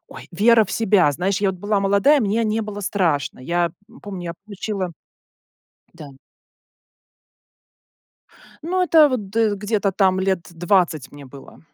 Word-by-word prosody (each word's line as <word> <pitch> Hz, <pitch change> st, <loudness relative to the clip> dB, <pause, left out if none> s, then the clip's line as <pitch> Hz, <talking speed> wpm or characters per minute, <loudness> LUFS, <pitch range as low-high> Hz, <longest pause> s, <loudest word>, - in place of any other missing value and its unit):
ой, -, -, -12 dB
вера 220 Hz, +5 st, +4 dB
в 190 Hz, -, -11 dB
себя. 200 Hz, -9 st, +3 dB
Знаешь, 190 Hz, +7 st, -1 dB
я 200 Hz, -, +2 dB
вот 185 Hz, -, -9 dB
была 205 Hz, -1 st, 0 dB
молодая, 200 Hz, +10 st, +3 dB
мне 220 Hz, +1 st, 0 dB
не 220 Hz, +1 st, -1 dB
было 210 Hz, -1 st, -7 dB
страшно. 175 Hz, -8 st, -1 dB
Я, 170 Hz, +5 st, -1 dB, 0.2 s
м, 245 Hz, -, -17 dB
помню, 190 Hz, -4 st, -8 dB
я 170 Hz, -, -4 dB
включила 200 Hz, -3 st, -5 dB, 1.0 s
Да. 150 Hz, -5 st, -12 dB, 2.5 s
Ну 365 Hz, +3 st, 0 dB
это 320 Hz, -4 st, +5 dB
вот 215 Hz, -7 st, -4 dB
да, 220 Hz, -1 st, +1 dB
где-то 205 Hz, -1 st, -1 dB
там 190 Hz, -1 st, +2 dB
лет 190 Hz, -3 st, -1 dB
20 170 Hz, -4 st, 0 dB
мне 145 Hz, -1 st, -12 dB
было. 135 Hz, +1 st, -14 dB
200 Hz, 150 wpm, -21 LUFS, 175-215 Hz, 2.5 s, это